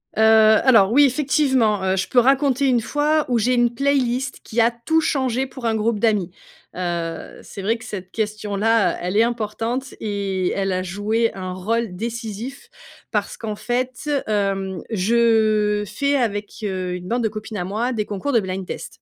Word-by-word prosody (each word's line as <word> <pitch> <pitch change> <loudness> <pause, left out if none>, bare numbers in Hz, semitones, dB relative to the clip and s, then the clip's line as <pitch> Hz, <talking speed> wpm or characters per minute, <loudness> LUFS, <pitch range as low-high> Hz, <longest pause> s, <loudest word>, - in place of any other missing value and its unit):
Heu, 220 - +1
alors, 220 -1 +6
oui, 285 +3 +6
effectivement, 260 -6 +2
heu, 190 0 +1
je 185 - -1
peux 250 - +4
raconter 270 +1 +3
une 245 -3 +3
fois 300 +4 +1
où 240 -2 +2
j'ai 250 +3 +2
une 240 0 +2
playlist 270 -1 0
qui 230 0 0
a 230 - +5
tout 240 +8 0
changé 260 -4 0
pour 260 -1 -9
un 225 - +2
groupe 220 0 0
d'amis. 205 -5 +1 0.4
Heu, 170 -2 -4
c'est 195 - -9
vrai 225 +3 +1
que 230 - -12
cette 185 -2 -7
question-là, 215 -1 0
elle 180 +3 -1
est 225 - +6
importante 235 +3 -3
et 195 -3 -2
elle 195 -1 -1
a 185 0 -1
joué 210 +5 0
un 185 -1 -5
rôle 215 +2 -2
décisif, 230 +4 -6 0.4
parce - - -2
qu'en 215 -2 -4
fait, 255 +5 -3 0.2
hem, 195 -3 -1
je 215 0 +2
fais 280 +8 0
avec, 210 -6 -1
heu, 185 -3 -2
une 180 0 -6
bande 240 +2 -1
de 220 - +1
copines 215 0 -7
à 180 - -2
moi, 220 +7 -1
des 215 -3 -2
concours 210 +8 -3
de 235 - +5
blind-test. 190 -2 -5
220 Hz, 175 wpm, -21 LUFS, 200-245 Hz, 0.4 s, alors